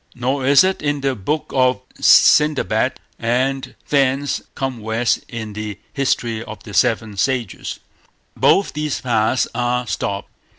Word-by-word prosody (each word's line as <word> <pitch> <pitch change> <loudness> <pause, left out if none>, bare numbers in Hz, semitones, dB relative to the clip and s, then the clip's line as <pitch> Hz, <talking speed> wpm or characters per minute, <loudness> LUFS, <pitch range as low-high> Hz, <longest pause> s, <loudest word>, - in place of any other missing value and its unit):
Nor 130 +2 -1
is 140 +5 +7
it 190 0 0
in 145 -1 -1
the 135 -1 0
Book 135 +8 -3
of 130 -1 +3 0.2
Sendabad, 150 -1 +4 0.3
and 130 +3 -1
thence 140 0 +1
come 135 -3 -3
west 110 +2 0
in 110 -3 -6
the 105 -1 -5 0.2
History 120 -5 -1
of 105 -1 -10
the 105 - -10
Seven 110 -3 +1
Sages. 125 -1 -2 0.6
Both 195 - +3
these 150 -1 -2
paths 115 0 +1
are 125 0 0
stopped. 100 -1 -3
125 Hz, 135 wpm, -19 LUFS, 110-140 Hz, 0.6 s, is